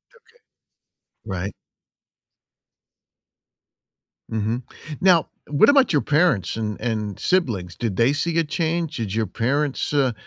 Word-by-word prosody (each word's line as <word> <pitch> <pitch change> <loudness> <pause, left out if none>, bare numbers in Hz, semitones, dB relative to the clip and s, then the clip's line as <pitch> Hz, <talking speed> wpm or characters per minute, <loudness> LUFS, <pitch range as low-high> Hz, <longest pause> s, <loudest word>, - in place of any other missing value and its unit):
Okay. 475 - -22 1.1
Right. 95 -1 -4 2.8
Mhm. 110 +3 -2 0.4
Now 180 -4 +4 0.2
what 145 - +4
about 275 -2 +5
your 145 - +3
parents 150 - +2
and 105 -2 -3
and 110 -4 -3
siblings? 110 - 0
Did 115 -6 -3
they 120 +4 +4
see 170 +3 -1
a 165 - +4
change? 160 0 -2
Did 110 -4 -3
your 110 -1 0
parents, 140 +9 -1
uh, 135 -4 +2
130 Hz, 115 wpm, -22 LUFS, 110-160 Hz, 2.8 s, about